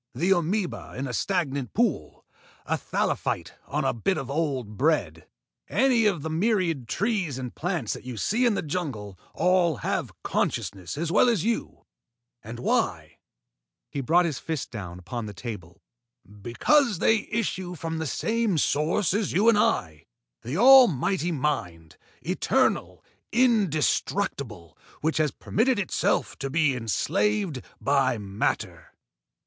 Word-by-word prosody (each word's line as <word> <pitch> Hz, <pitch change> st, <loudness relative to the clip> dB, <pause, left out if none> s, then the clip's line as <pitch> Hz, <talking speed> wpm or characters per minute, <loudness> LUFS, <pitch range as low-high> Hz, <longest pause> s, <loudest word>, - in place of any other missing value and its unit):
The 175 Hz, +9 st, +1 dB
amoeba 180 Hz, +2 st, -1 dB
in 135 Hz, -, -2 dB
a 125 Hz, -, -5 dB
stagnant 140 Hz, -, -1 dB
pool, 200 Hz, -, -1 dB, 0.4 s
a -, -, 0 dB
thallophyte -, -, -2 dB, 0.2 s
on -, -, -1 dB
a -, -, +2 dB
bit 180 Hz, -, 0 dB
of 135 Hz, 0 st, -4 dB
old 135 Hz, -8 st, -2 dB
bread, 100 Hz, -, 0 dB, 0.4 s
any 250 Hz, -5 st, +3 dB
of 175 Hz, -8 st, 0 dB
the 160 Hz, -, -3 dB
myriads 180 Hz, -, +1 dB
of 120 Hz, -, -17 dB
trees 195 Hz, -, -1 dB
and 125 Hz, -2 st, -5 dB
plants 175 Hz, -2 st, -2 dB
that -, -, -9 dB
you 125 Hz, -2 st, -7 dB
see 235 Hz, -, +1 dB
in 225 Hz, -, +2 dB
the -, -, -2 dB
jungle 135 Hz, -, -4 dB, 0.2 s
all 180 Hz, -3 st, +3 dB
have -, -, -1 dB
consciousness 95 Hz, +6 st, -2 dB
as 165 Hz, +1 st, -2 dB
well 245 Hz, -, +5 dB
as 215 Hz, -8 st, +1 dB
you. 230 Hz, +1 st, -2 dB, 0.6 s
And 115 Hz, +3 st, -8 dB
why?" 120 Hz, -, -1 dB, 0.7 s
He 140 Hz, -, -3 dB
brought 170 Hz, +7 st, +3 dB
his 155 Hz, -6 st, -2 dB
fist 160 Hz, -4 st, -4 dB
down 90 Hz, -6 st, -7 dB
upon 110 Hz, +5 st, -6 dB
the 105 Hz, -, -8 dB
table. 95 Hz, -4 st, -8 dB, 0.4 s
"Because 145 Hz, -, +1 dB
they 220 Hz, +4 st, +2 dB
issue 185 Hz, -5 st, -2 dB
from 165 Hz, 0 st, -4 dB
the 160 Hz, -, -2 dB
same 225 Hz, -, 0 dB
source 160 Hz, +6 st, +1 dB
as 205 Hz, -1 st, 0 dB
you 210 Hz, +6 st, +4 dB
and 225 Hz, -, +4 dB
I, 80 Hz, -, 0 dB, 0.3 s
the 130 Hz, +8 st, -4 dB
almighty 195 Hz, -, +6 dB
mind, 90 Hz, -, -3 dB, 0.3 s
eternal, -, -, 0 dB, 0.3 s
indestructible, 170 Hz, -, 0 dB, 0.3 s
which 160 Hz, +1 st, 0 dB
has 155 Hz, -1 st, +2 dB
permitted 240 Hz, -, 0 dB
itself 200 Hz, -3 st, 0 dB
to 135 Hz, -, -3 dB
be 150 Hz, -2 st, +2 dB
enslaved 145 Hz, -, 0 dB, 0.2 s
by 135 Hz, -3 st, +2 dB
matter. 100 Hz, -1 st, -3 dB
160 Hz, 145 wpm, -26 LUFS, 120-195 Hz, 0.7 s, almighty